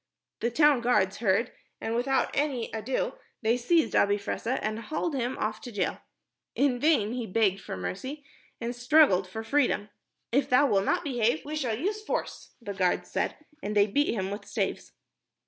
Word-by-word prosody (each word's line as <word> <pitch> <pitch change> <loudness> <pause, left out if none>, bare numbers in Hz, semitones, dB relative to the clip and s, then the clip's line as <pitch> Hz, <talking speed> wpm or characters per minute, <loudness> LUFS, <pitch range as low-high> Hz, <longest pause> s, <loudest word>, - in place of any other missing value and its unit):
The 235 - 0
town 290 0 +4
guards 210 -6 +2
heard, 220 +2 +1 0.3
and 225 - -3
without 260 +3 +1
any 275 -5 -1
ado 255 - -2 0.3
they 225 +2 +3
seized 315 +7 +2
Abi 205 0 +4
Fressah 230 +5 -2
and 215 +1 -2
hauled 310 +7 -3
him 255 -1 -2
off 215 0 -2
to 250 - -7
the - - -16
jail. 185 - 0 0.6
In 270 -3 +2
vain 240 -7 +3
he 245 -3 -3
begged 195 -1 +1
for - - -6
mercy 260 - -5 0.3
and 235 +1 -3
struggled 245 - +4
for 220 +4 -6
freedom. 240 -4 +1 0.4
"If 270 +3 +2
thou 255 +3 +5
wilt 195 -7 +2
not - - +1
behave, 245 0 0
we 300 +1 -4
shall 250 -8 -1
use 410 - -2
force," - - -4
the 205 -4 -6
guards 185 -2 0
said, - - -1 0.2
and 210 -3 -3
they 205 -1 +6
beat 285 +9 +1
him 190 -2 -2
with 205 - -6
staves. - - -3
235 Hz, 180 wpm, -28 LUFS, 210-280 Hz, 0.6 s, they